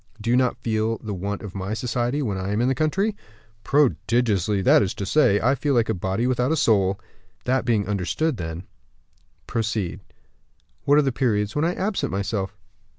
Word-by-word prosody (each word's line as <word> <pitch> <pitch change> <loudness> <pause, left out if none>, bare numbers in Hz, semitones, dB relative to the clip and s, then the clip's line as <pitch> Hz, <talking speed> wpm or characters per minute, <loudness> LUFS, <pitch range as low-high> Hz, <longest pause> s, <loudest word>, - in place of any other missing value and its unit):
Do 115 +2 -1
you - - +4
not 125 -1 +2
feel 110 0 0
the 105 0 -6
want 100 +3 -4
of 100 -3 -7
my 100 +2 -3
society 120 +4 -1
when 105 -6 -2
I 95 +1 -3
am 105 - 0
in 120 - +2
the 135 - +2
country?" 190 - 0 0.5
"Prodigiously; 115 - +1
that - - +6
is 95 - -1
to 100 - -4
say, 105 -4 +3
I 130 +4 +3
feel 140 0 0
like 115 -2 +2
a - - +2
body 95 +4 -1
without 125 +2 +1
a - - +3
soul." 100 -6 +2 0.5
"That 130 0 +1
being 110 -5 +1
understood 105 - -1
then, 80 0 -5 0.8
proceed." 110 -5 -2 0.9
"What 145 +1 +5
are 150 - +5
the 135 - +1
periods 110 -4 0
when 150 +2 +1
I 175 - 0
absent 200 +1 -1
myself?" 100 0 -3
115 Hz, 190 wpm, -23 LUFS, 100-130 Hz, 0.9 s, that